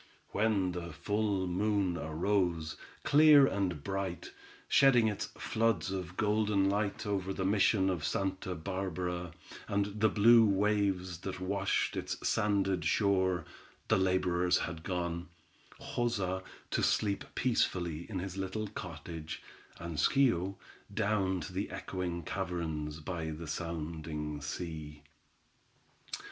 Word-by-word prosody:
When 100 -3 +1
the 85 -1 -5
full 100 +4 0
moon 95 0 +1
arose, 80 +1 0 0.3
clear 150 -1 +7
and 95 - -1
bright, 95 -3 -3 0.4
shedding 130 -5 +5
its 105 -2 -2
floods 110 -6 0
of 90 -2 -5
golden 105 -2 +2
light 100 +2 -1
over 95 -2 -1
the 95 0 -2
mission 100 0 +3
of 90 -5 -1
Santa 95 -1 -1
Barbara, 90 0 -3 0.4
and 100 +1 -1
the 110 - +6
blue 115 +3 +7
waves 100 -4 +1
that 95 0 -5
washed 100 +1 0
its - - -3
sanded 100 -5 +1
shore, 95 0 +2 0.4
the - - +5
laborers 90 -1 +2
had 85 -2 -4
gone—Joza, 90 +4 -3 0.3
to - - +1
sleep 100 -2 +1
peacefully 85 -9 0
in 100 - -3
his 95 +1 -4
little 100 +2 -3
cottage, 80 -4 -7 0.3
and 85 -2 -6
Schio, 100 - +3 0.4
down 100 -3 +1
to 80 +5 -7
the 95 +2 -2
echoing 90 -2 -4
caverns 80 -4 -3
by 80 0 -4
the 80 +2 -6
sounding 75 -2 -4
sea. 75 -1 -6
95 Hz, 115 wpm, -32 LUFS, 85-100 Hz, 0.4 s, clear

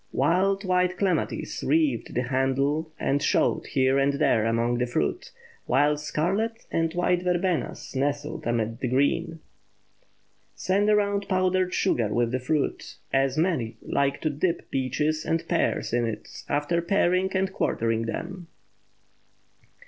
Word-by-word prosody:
Wild 190 +8 +2
white 180 0 +1
clematis 190 -2 -1
wreathed 315 -3 +1
the 125 - +1
handle 135 +5 0
and 140 +1 +1
showed - - +1
here 130 0 +2
and 140 +1 +2
there 135 -6 +2
among 115 +1 +1
the 125 - 0
fruit, 75 -11 -2 0.4
while 145 +4 +3
scarlet 195 +10 -2
and 165 0 +1
white 180 0 +1
verbenas 180 -4 -1
nestled 145 +3 -2
amid 115 -1 -1
the 130 - -1
green. 155 +6 0 1.1
Send 200 +3 +1
around 205 -1 +2
powdered 185 -1 +1
sugar 120 - +1
with 115 +2 0
the 130 - 0
fruit, 145 +3 -2 0.2
as 135 0 +2
many 155 -9 0
like 140 0 0
to 155 - 0
dip 165 +4 -2
peaches 150 +4 0
and 165 0 -1
pears 170 -8 0
in 120 -1 +2
it 110 - -7
after 145 +4 0
paring 185 +1 +2
and 190 0 -1
quartering 115 -6 0
them. 180 +8 -5
155 Hz, 135 wpm, -26 LUFS, 130-180 Hz, 1.1 s, while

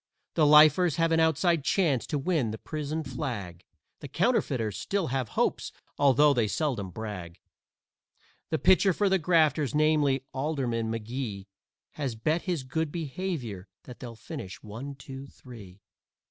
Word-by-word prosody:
The 155 -3 +3
Lifers 150 +2 +6
have 165 0 +1
an 165 - +3
outside 160 0 +2
chance 150 - +1
to 150 - -1
win 145 -5 0
the 110 - -5
prison 155 +4 -4
flag; 110 - -5 0.4
The 145 - -8
Counterfeiters 135 - 0
still 190 - -2
have 130 -3 -2
hopes, - - 0 0.3
although 145 +1 +5
they 120 -5 +1
seldom 115 -5 -2
brag. 90 -4 -7 1.1
The 160 - 0
pitcher 190 +3 +4
for 200 +3 +1
the 190 0 +3
Grafters, 155 -5 +2
namely, 150 -3 +2
Alderman 130 -5 -1
McGee, 115 -3 -4 0.5
Has 135 -6 -4
bet 155 +9 0
his 175 -7 -2
good 150 +4 -2
behavior 145 - -4 0.2
that 125 - -11
they'll 120 -3 -8
finish 95 -3 -8
one, 120 +7 -7
two, 135 0 -9
three. 105 -9 -13
140 Hz, 145 wpm, -28 LUFS, 115-160 Hz, 1.1 s, Lifers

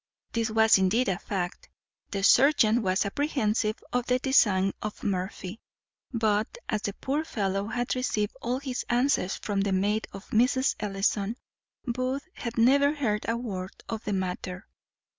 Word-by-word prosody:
This 230 0 0
was 220 -1 +5
indeed 200 +5 +2
a 190 0 -1
fact; 180 -3 -4 0.4
the 195 -1 -3
serjeant 245 -2 +5
was 190 0 +1
apprehensive 215 -3 0 0.2
of 245 0 0
the 250 - +3
design 205 -8 +3
of 215 0 -6
Murphy; 190 +1 -3 0.5
but, 220 - 0
as 215 -3 -1
the 200 - -3
poor 280 +8 -2
fellow 200 -7 -2
had 245 +3 -1
received 215 -5 -1
all 245 +2 -1
his 265 -2 -3
answers 240 -6 +2
from 200 -2 -2
the 200 0 0
maid 205 +3 +1
of 195 0 -10
Mrs. 255 +4 +3
Ellison, 205 +2 -1 0.5
Booth 255 +4 -2
had 235 0 -6
never 280 +5 +4
heard 220 -8 -1
a 230 - +1
word 195 -6 -5
of 225 0 -4
the 210 - -2
matter. 185 0 -3
220 Hz, 155 wpm, -27 LUFS, 195-250 Hz, 0.5 s, was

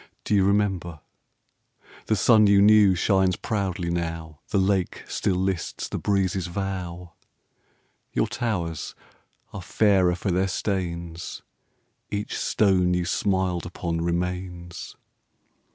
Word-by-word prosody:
do - - -2
you 100 -2 +4
remember? 95 -5 0 1.1
The 110 - +2
sun 105 +2 +5
you 100 0 +5
knew 105 -2 +6
shines 95 0 +2
proudly 95 -5 -2
now 80 -2 -4
The 105 - 0
lake 95 -1 0
still 95 - -1
lists 95 -1 -2
the - - -4
breezes' 95 -2 0
vow; 90 -2 -5 1.0
Your - - +1
towers 85 -10 -3 0.6
are 100 - -6
fairer 95 -2 +3
for 90 +2 -2
their 95 +2 +1
stains, 85 -3 -4 0.7
Each 105 0 -3
stone 90 -4 +2
you 90 -1 0
smiled 95 -1 0
upon 85 -1 -3
remains. 90 0 -4
95 Hz, 115 wpm, -25 LUFS, 85-100 Hz, 1.1 s, knew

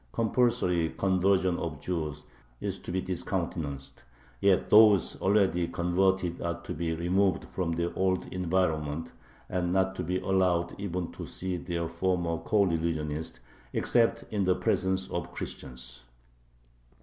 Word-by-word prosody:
Compulsory 110 -8 +2
conversion 95 -1 +2
of 80 -4 -4
Jews 75 -3 -3 0.4
is - - -3
to - - -7
be 95 +1 -1
discountenanced; 85 -6 -3 0.4
yet 100 -2 +3
those 105 -2 +6
already 95 -3 +3
converted 90 +1 +1
are 85 0 -2
to - - -5
be 80 +1 -2
removed 90 +3 +1
from 90 -3 -1
their 85 +1 -1
old 95 -1 +1
environment, 80 -4 0 0.4
and 90 -1 -1
not 95 0 +2
to 90 - -2
be 90 +2 -1
allowed 90 -3 +1
even 90 -3 -3
to - - -8
see 95 0 -4
their 85 -1 -3
former 85 -1 -1
coreligionists, 80 -5 0 0.4
except 115 -1 +2
in 100 -2 +1
the 90 -1 +3
presence 95 +1 0
of - - -3
Christians. 65 0 -7
90 Hz, 130 wpm, -29 LUFS, 85-95 Hz, 0.4 s, those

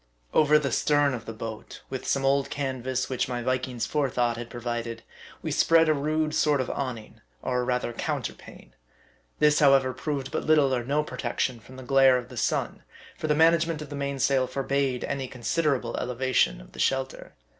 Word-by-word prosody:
Over 150 0 +5
the 140 -4 -1
stern 145 0 +2
of 120 -3 -6
the - - -5
boat, 110 0 -8
with 130 - -5
some 135 -1 +1
old 140 0 +2
canvas 130 -2 -2
which 130 - -1
my 120 -1 -3
Viking's 130 -1 -1
forethought 125 -5 0
had 120 0 -7
provided, 120 -1 -4 0.4
we - - -2
spread 165 0 +4
a 155 - +4
rude 155 +1 -1
sort 150 -2 +2
of 130 - -1
awning, 125 -6 -5 0.2
or 125 -1 0
rather 125 -1 -1
counterpane. - - -5 0.7
This, 150 0 +4
however, 135 -3 +4
proved 140 0 -4
but - - -2
little 150 -4 +4
or 125 -2 0
no 145 +5 0
protection 125 -2 -2
from 125 +4 -15
the 130 - -9
glare 135 0 +5
of 125 - -6
the - - -10
sun; - - -1 0.3
for 155 - -4
the 150 - +2
management 165 0 +3
of 150 - -11
the - - -4
main 140 0 -3
sail 130 -1 +2
forbade 135 0 -1
any 135 -2 -3
considerable 125 +1 -1
eleva 125 +1 -3
tion - - +3
of - - -16
the - - -13
shelter. 135 0 -1
130 Hz, 190 wpm, -26 LUFS, 125-145 Hz, 0.7 s, Over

